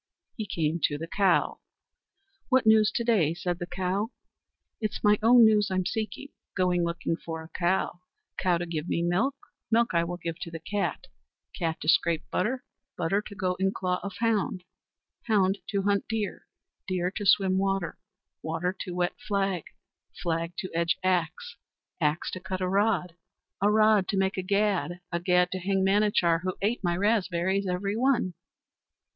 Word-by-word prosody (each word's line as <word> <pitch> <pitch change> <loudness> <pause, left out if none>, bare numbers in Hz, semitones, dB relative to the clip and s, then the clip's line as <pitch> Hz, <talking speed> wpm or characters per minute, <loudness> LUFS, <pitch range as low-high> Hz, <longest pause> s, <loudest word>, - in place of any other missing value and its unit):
He 215 -3 -4
came 160 -1 -1
to 145 - -1
the 165 - -5
cow. 190 +1 +2 0.9
"What 260 -3 +3
news 220 -1 +5
to 235 - 0
day?" 190 -10 +2
said 175 0 -3
the 175 - -4
cow. 190 +4 -1 0.7
"It's 215 -2 -3
my 210 0 +5
own 235 +1 +7
news 210 -2 +4
I'm 185 -1 0
seeking. 220 +8 -3 0.3
Going 180 -2 +2
looking 170 -1 -1
for 165 -1 -6
a 160 - -13
cow, 180 0 0 0.4
cow 180 -3 +2
to 175 - -3
give 165 -1 -4
me 170 - 0
milk, 195 +11 +1 0.3
milk 230 -1 +2
I 170 0 +3
will 175 +1 -4
give 165 -1 -5
to 180 - -5
the 165 - -6
cat, 200 +5 -2 0.5
cat 165 -4 -2
to - - -6
scrape 165 0 +3
butter, 250 +7 -1 0.3
butter 195 +5 +1
to 205 - -10
go 185 -1 0
in 190 0 +1
claw 180 -1 -1
of 200 -2 -6
hound, 215 -5 0 0.6
hound 200 -3 +2
to 200 -2 0
hunt 200 0 +1
deer, 220 -3 -3 0.4
deer 180 -1 -1
to 205 - -3
swim 190 -1 +4
water, 195 -4 -1 0.4
water 165 +4 -2
to 180 -3 -5
wet 175 0 0
flag, 195 -4 0 0.6
flag 165 0 -1
to 185 - -4
edge 170 0 +1
axe, 185 - -1 0.4
axe 150 0 0
to 185 - -5
cut 185 0 -4
a 185 - -1
rod, 195 -3 +1 0.5
a 205 - +4
rod 215 -2 +4
to 200 - -1
make 190 0 +1
a 185 - -1
gad, 195 -2 0
a 170 - 0
gad 180 0 +2
to 185 - -2
hang 190 +1 +1
Manachar, 195 -4 +3
who 185 0 -2
ate 215 +2 0
my 175 -1 +1
raspberries 195 -2 +1
every 195 +3 -1
one." 240 -6 +1
185 Hz, 175 wpm, -27 LUFS, 175-205 Hz, 0.9 s, own